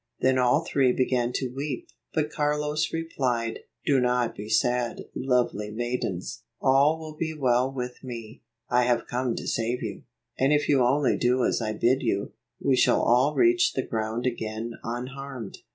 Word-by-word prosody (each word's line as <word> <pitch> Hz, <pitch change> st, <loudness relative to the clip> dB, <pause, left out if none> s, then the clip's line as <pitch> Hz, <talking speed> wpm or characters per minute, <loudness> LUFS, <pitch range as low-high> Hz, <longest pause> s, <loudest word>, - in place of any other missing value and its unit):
Then 130 Hz, 0 st, +3 dB
all 125 Hz, +6 st, +3 dB
three 135 Hz, -5 st, +3 dB
began 125 Hz, -1 st, +1 dB
to 130 Hz, -2 st, -2 dB
weep, 140 Hz, -1 st, -4 dB, 0.2 s
but 150 Hz, -1 st, -1 dB
Carlos 150 Hz, +1 st, 0 dB
replied, 130 Hz, -8 st, -1 dB, 0.3 s
"Do 140 Hz, -2 st, +4 dB
not 125 Hz, -1 st, +1 dB
be 105 Hz, +1 st, -7 dB
sad, 120 Hz, +2 st, +1 dB
lovely 125 Hz, -5 st, 0 dB
maidens. 110 Hz, -5 st, -3 dB, 0.2 s
All 140 Hz, +4 st, +4 dB
will 160 Hz, -1 st, -8 dB
be 160 Hz, 0 st, -3 dB
well 130 Hz, -2 st, +2 dB
with 125 Hz, -1 st, -6 dB
me. 115 Hz, -4 st, -8 dB, 0.3 s
I 125 Hz, 0 st, +3 dB
have 120 Hz, -1 st, +1 dB
come 125 Hz, -1 st, -1 dB
to -, -, -5 dB
save 120 Hz, +2 st, -1 dB
you, 105 Hz, -4 st, -5 dB, 0.4 s
and 135 Hz, +2 st, +3 dB
if 150 Hz, 0 st, +2 dB
you 135 Hz, -3 st, +4 dB
only 135 Hz, +3 st, +2 dB
do 125 Hz, +1 st, +2 dB
as -, -, +1 dB
I 110 Hz, -1 st, -1 dB
bid 125 Hz, +5 st, +2 dB
you, 100 Hz, -5 st, -1 dB, 0.3 s
we 135 Hz, -, +2 dB
shall -, -, +3 dB
all 130 Hz, +5 st, +3 dB
reach 355 Hz, +1 st, +4 dB
the -, -, -1 dB
ground 110 Hz, +2 st, -2 dB
again 115 Hz, -2 st, -3 dB
unharmed." 125 Hz, -1 st, -6 dB
125 Hz, 170 wpm, -26 LUFS, 120-140 Hz, 0.4 s, Do